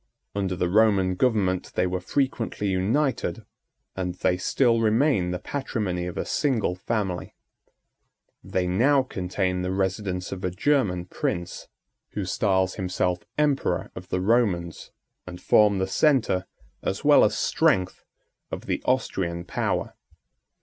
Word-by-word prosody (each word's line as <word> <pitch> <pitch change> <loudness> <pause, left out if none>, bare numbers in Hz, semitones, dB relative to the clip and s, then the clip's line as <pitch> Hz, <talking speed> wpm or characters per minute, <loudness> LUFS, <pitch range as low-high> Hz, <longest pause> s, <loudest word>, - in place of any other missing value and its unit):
Under 95 -2 -1
the 90 0 0
Roman 100 -1 +3
government 95 -4 0
they - - +2
were 90 0 -1
frequently 115 -2 -1
united, 115 +4 0 0.5
and 90 -2 -3
they 90 - +1
still 115 +5 +2
remain 110 -3 +2
the 90 - -2
patrimony 100 -8 -3
of 90 - -6
a - - -2
single 125 - 0
family. 95 -1 -3 1.1
They 90 -1 -1
now 130 +10 +3
contain 90 -4 -2
the 90 - -2
residence 95 -1 -2
of 95 -1 -6
a 90 - +1
German 95 -3 +1
prince, 85 -1 -4 0.5
who 100 - -3
styles 95 -1 +1
himself 90 -2 -1 0.2
Emperor 150 -2 0
of 90 0 -9
the 90 - -1
Romans, 95 -6 0 0.4
and 90 -1 -8
form 105 -2 +4
the 95 - +1
centre, 95 -4 +2 0.3
as - - -3
well - - +7
as - - +2
strength, 95 -1 +1 0.5
of - - -6
the - - -2
Austrian 90 -9 -1
power. - - -2
95 Hz, 135 wpm, -25 LUFS, 90-115 Hz, 1.1 s, well